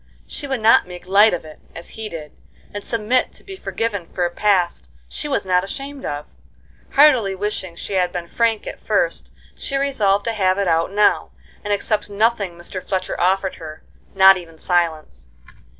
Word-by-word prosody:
She 285 - -7
would 265 -4 -2
not 220 -4 +5
make 180 0 -10
light 205 +4 +5
of 175 -2 -3
it, 155 -1 -12 0.2
as 170 - -9
he 220 -1 -5
did, 155 -4 -8 0.4
and 205 0 -5
submit 230 +2 0
to - - -11
be 390 - -9
forgiven 220 - -3
for 180 - -2
a 175 - -2
past 185 -3 +1 0.2
she 295 - -4
was 275 - -1
not 180 -1 +2
ashamed 275 +7 -6
of. 145 0 -4 0.7
Heartily 255 -9 +5
wishing 190 -3 -4
she 200 - -7
had 180 -2 +1
been 175 -1 -4
frank 225 +4 0
at - - -7
first, - - -1 0.2
she 275 - -4
resolved 210 -8 +1
to 230 - -1
have 190 -3 +1
it 200 -1 0
out 165 +1 +1
now, 210 +1 +2 0.3
and 205 - -3
accept 210 +1 0
nothing 205 -2 +1
Mr. 175 +2 -7
Fletcher 185 -1 -3
offered 190 +1 +1
her, 155 -1 -10 0.3
not 190 0 +8
even 165 -3 -11
silence. 160 - -1
195 Hz, 180 wpm, -20 LUFS, 175-220 Hz, 0.7 s, not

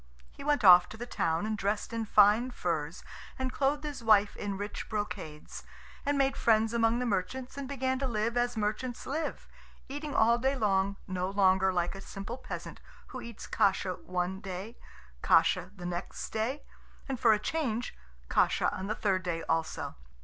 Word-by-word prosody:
He - - -11
went 290 -4 +1
off 180 -2 +8
to 220 - -9
the 240 - -5
town, 165 -6 -1
and 215 0 -1
dressed 205 +2 -2
in 230 -1 -2
fine 210 +4 +5
furs, 165 -7 -3 0.3
and 260 -1 -2
clothed 285 +2 +1
his 290 -5 -5
wife 210 -2 +4
in 200 -1 -4
rich 205 +2 -5
brocades, 205 -8 -5 0.4
and 285 0 +2
made 270 0 +2
friends 220 0 +3
among 230 0 +3
the 250 - -1
merchants, 245 +5 -2
and 280 -1 -5
began 260 -1 -1
to 270 - -1
live 230 0 -1
as 245 -1 0
merchants 220 +4 -2
live, 300 +3 -3 0.4
eating 290 +1 -5
all 235 +2 +4
day 265 +3 +1
long, 200 -4 +1
no 185 -1 -2
longer 190 -1 +3
like 175 -1 0
a 195 - -8
simple 200 +6 -7
peasant - - -7 0.3
who 255 - -7
eats 235 -2 -8
kasha 190 -1 +1
one 180 +1 -3
day, 195 +3 -6 0.5
kasha 170 +2 +3
the 180 -2 -8
next 175 +1 -4
day, 230 +6 -2 0.4
and 265 -3 -3
for 230 - +5
a 215 - +5
change 245 -1 -2 0.3
kasha - - +2
on 190 - -5
the 215 - -1
third 190 -3 +1
day 170 -2 -3
also. 165 -1 -1
215 Hz, 180 wpm, -30 LUFS, 190-250 Hz, 0.5 s, off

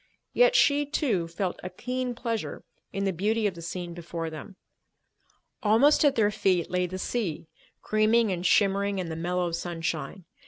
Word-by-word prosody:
Yet - - +4
she, 290 0 +4
too, 230 - 0
felt 175 +2 -3
a 185 - -5
keen 250 +3 -3
pleasure 230 -2 -4 0.3
in 195 - -3
the 195 - 0
beauty 215 +5 0
of 200 - +1
the 170 - -10
scene 175 +1 -5
before 170 -1 -5
them. 170 +6 -9 1.1
Almost 230 +10 +4
at 285 -2 +4
their 210 -2 +3
feet 185 -5 +1
lay 180 0 +1
the 185 +2 -6
sea, 185 -6 -3 0.4
creaming 215 0 +3
and 175 -1 -3
shimmering 200 +1 +2
in 180 -3 -3
the 160 - -4
mellow 175 +1 -1
sunshine. 170 +2 -4
195 Hz, 165 wpm, -27 LUFS, 175-230 Hz, 1.1 s, Yet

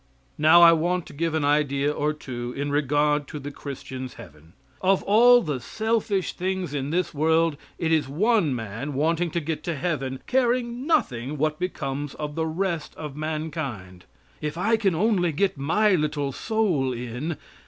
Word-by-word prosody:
Now, 160 +3 +7
I 170 - +10
want 175 +2 +1
to - - -12
give 165 +2 -1
an 155 -2 +1
idea 145 -1 +2
or 150 0 0
two 125 -5 -6
in 140 +1 -2
regard 145 0 +1
to 150 - -6
the 145 +1 -6
Christian's 130 -2 -7
heaven. 80 -6 -14 0.3
Of 190 0 +2
all 240 +4 +6
the 150 -5 -2
selfish 215 - -1
things 185 -3 -3
in 140 -1 -2
this 175 +3 -1
world, 160 +1 +2 0.2
it 165 -1 -1
is 155 -4 +2
one 180 - +2
man 115 +5 -5
wanting 165 +4 +1
to 170 - -1
get 160 0 -3
to 170 - -1
heaven, 135 -5 -2
caring 245 0 0
nothing 145 - 0
what 155 +1 0
becomes 145 -5 -3
of 150 -1 -5
the 160 +1 -1
rest 170 0 -2
of 150 -3 -7
mankind. 150 - -5 0.4
"If 150 +1 -3
I 215 +6 +2
can 200 -6 +1
only 180 -2 +2
get 190 +6 0
my 190 +10 +2
little 150 -4 0
soul 180 - 0
in." 125 +7 -4
155 Hz, 170 wpm, -25 LUFS, 140-180 Hz, 0.4 s, I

